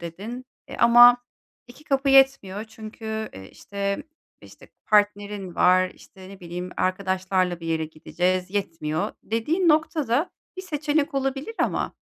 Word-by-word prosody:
dedin, 205 +10 -7 0.2
eee, - - -8
ama 240 +1 +8 0.5
2 250 +5 -16
kapı 275 0 0
yetmiyor 265 -7 +3
çünkü, 220 0 -7
eee, 95 0 -11
işte, 200 0 -4 0.4
işte - - -16 0.2
partnerin 205 -3 +1
var; 185 0 +4
işte, 190 -1 -15
ne 195 0 -12
bileyim, 180 +1 -6
arkadaşlarla 185 -1 0
bir 165 - -7
yere 160 -1 -1
gideceğiz, 180 +4 -2
yetmiyor 165 -2 -2
dediğin 310 - 0
noktada 310 -2 +1 0.3
bir 375 - -6
seçenek 305 -2 -1
olabilir 270 +9 -2
ama, - - -1
205 Hz, 130 wpm, -24 LUFS, 185-270 Hz, 0.5 s, ama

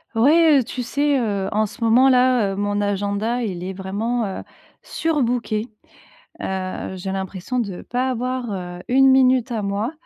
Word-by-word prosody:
Oui, 240 +6 +5 0.3
heu, - - 0
tu 250 +2 -5
sais, 285 +3 +1
heu, 200 -5 -1
en 215 +1 +2
ce 210 - -11
moment, 245 +4 +5
là, 250 -5 +3
heu, - - -5
mon 205 0 -1
agenda, 205 +4 -1
il 180 -5 -4
est 190 - -4
vraiment, 210 +5 -2
heu, 195 - -5 0.4
surbooké. 245 -7 -1 0.7
Heu, 190 0 -4
j'ai 190 +1 -5
l'impression 190 +5 -4
de 200 -6 -4
pas 250 +2 -2
avoir, 255 0 -3
heu, 180 -2 -6
1 270 +2 +5
minute 260 -1 +3
à 225 -2 -1
moi 200 +4 -2
225 Hz, 165 wpm, -21 LUFS, 195-250 Hz, 0.7 s, Oui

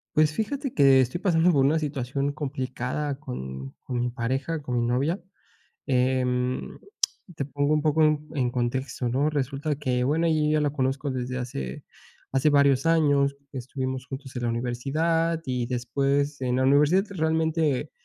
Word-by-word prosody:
Pues, 155 0 +4
fíjate 270 - -2
que 135 -2 +6
estoy 130 +8 0
pasando 175 -2 +3
por 135 -2 +4
una 155 +3 +3
situación 140 -1 -2
complicada 135 +1 -3
con 65 - -7
con 125 -2 -2
mi 125 - 0
pareja, 135 +6 -2
con 125 -3 -3
mi 120 - +1
novia. 140 +10 0 0.6
Em, 125 -1 0 0.6
te 140 - -2
pongo 145 +2 0
un 150 - +2
poco 155 +1 +3
en 150 -1 +1
en 130 -4 +1
contexto, 125 +1 -2
¿no? 140 +5 +1
Resulta 145 +1 -2
que, 125 -3 0
bueno, 155 +5 +1
yo 155 -2 +2
ya 155 0 +2
la 145 - +2
conozco 135 0 -1
desde 130 0 -3
hace 65 - -5 0.5
hace 135 +3 +3
varios 140 -1 +4
años. 145 -4 +3 0.2
Estuvimos 130 0 -4
juntos 135 +1 -8
en 125 - -3
la 120 - +1
universidad, 155 +8 0
y 125 -2 -1
después 140 +4 0
en 125 -1 0
la 130 - +2
universidad 145 +7 +4
realmente 160 -5 0
140 Hz, 160 wpm, -26 LUFS, 125-150 Hz, 0.6 s, que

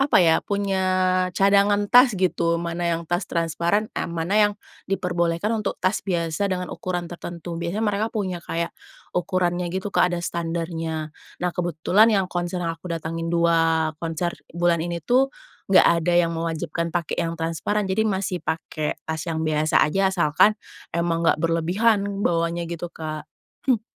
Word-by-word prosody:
apa 275 +1 +3
ya, 165 -3 +5
punya 200 -2 -1 0.6
cadangan 200 +1 +4
tas, 245 -3 +7
gitu, 170 -2 +1
mana 170 0 -2
yang 165 -1 0
tas 175 +3 -2
transparan, 170 +5 0
a - - -2
mana 170 +4 -2
yang 205 - -5 0.4
diperbolehkan 175 +1 0
untuk - - -3
tas 185 +3 0
biasa 170 +1 -1
dengan 180 -1 -2
ukuran 180 -1 -3
tertentu. 170 0 -7
Biasanya 185 +6 -2
mereka 210 +1 +1
punya 185 -6 -3
kayak 170 0 -3 0.4
ukurannya, 180 -1 0
gitu, 190 +3 -4
Kak, - - +4
ada 175 -1 -2
standarnya. 165 -2 -3 0.3
Nah, 180 - +2
kebetulan 175 +5 +3
yang 200 -4 +2
konser 175 0 -2
yang 165 - -1
aku 180 - -8
datangin, 165 0 -3
dua 165 -2 +2
konser 170 +1 -2 0.2
bulan 170 -1 +2
ini, 170 -1 -4
itu 260 +2 +3 0.4
nggak 190 - +6 0.2
ada 175 +2 0
yang 170 -1 +3
mewajibkan 165 0 -2
pakai 170 -1 -2
yang 165 - -5
transparan, 165 +6 -1
jadi 190 +2 0
masih 190 -2 -2
pakai 155 -1 -3
tas 160 0 -3
yang 160 -1 -1
biasa 155 0 +3
aja, 195 +5 +2
asalkan 185 +3 +3 0.4
emang 170 -1 0
nggak - - +4
berlebihan 200 +5 +1
bawanya, 170 0 0
gitu, 170 0 -5
Kak. 155 -1 -6 0.4
Hmm. 235 -4 +4
175 Hz, 160 wpm, -23 LUFS, 165-195 Hz, 0.6 s, tas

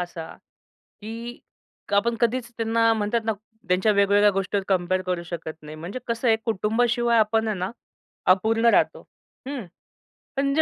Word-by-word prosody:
असा, 175 -2 -5 0.8
की 230 +3 -7 0.6
आपण 230 +3 +2
कधीच 235 0 0
त्यांना 230 0 +3
म्हणतात 220 +1 0
ना 220 - +1 0.3
त्यांच्या 185 +4 +3
वेगवेगळ्या 200 0 +4
गोष्टीवर 195 +1 -1
कंपेअर 185 -1 +1
करू 180 -2 -2
शकत 170 -2 -6
नाही. 155 0 -9
म्हणजे 170 +10 -6
कसं 235 +1 -1
आहे 225 - +6
कुटुंबाशिवाय 235 +2 +2
आपण 220 +1 +2
आहे 215 -2 -1
ना 185 +3 -2 0.6
अपूर्ण 225 +4 0
राहतो. - - +2 0.5
हं, 270 -6 -4 0.7
पण 275 0 +1
जे 315 - +4
220 Hz, 145 wpm, -24 LUFS, 185-230 Hz, 0.8 s, आहे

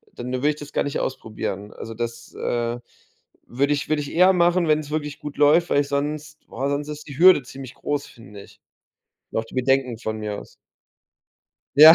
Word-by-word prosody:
dann 125 +1 -5
würde 135 +4 +2
ich 150 - 0
das 145 -1 -10
gar - - +2
nicht 145 - -2
ausprobieren. 105 -5 -4
Also, 115 - -7
das, 120 +1 -5
äh, 120 0 -2 0.7
würde 140 +4 0
ich 145 - -2
würde 155 -1 +2
ich 145 - -6
eher 185 +2 +6
machen, 175 -1 +3
wenn's 150 -1 +1
wirklich 150 -1 -3
gut 150 -1 -7
läuft, 155 +4 +5
weil 145 - +3
sonst 150 +2 -3
weil 140 +1 -2
sonst 145 +1 -2
ist 150 0 -7
die 140 0 -8
Hürde 180 -6 +8
ziemlich 135 0 -10
groß, 145 -1 -2
finde 105 -3 -13
ich - - -19 0.7
und - - 0
auch 115 - -4
die 115 - -13
Bedenken 130 -2 +2
von 110 -1 -4
mir 105 -1 -3
aus. - - -15 1.2
Ja, 155 +3 +11
140 Hz, 195 wpm, -23 LUFS, 120-150 Hz, 1.2 s, Ja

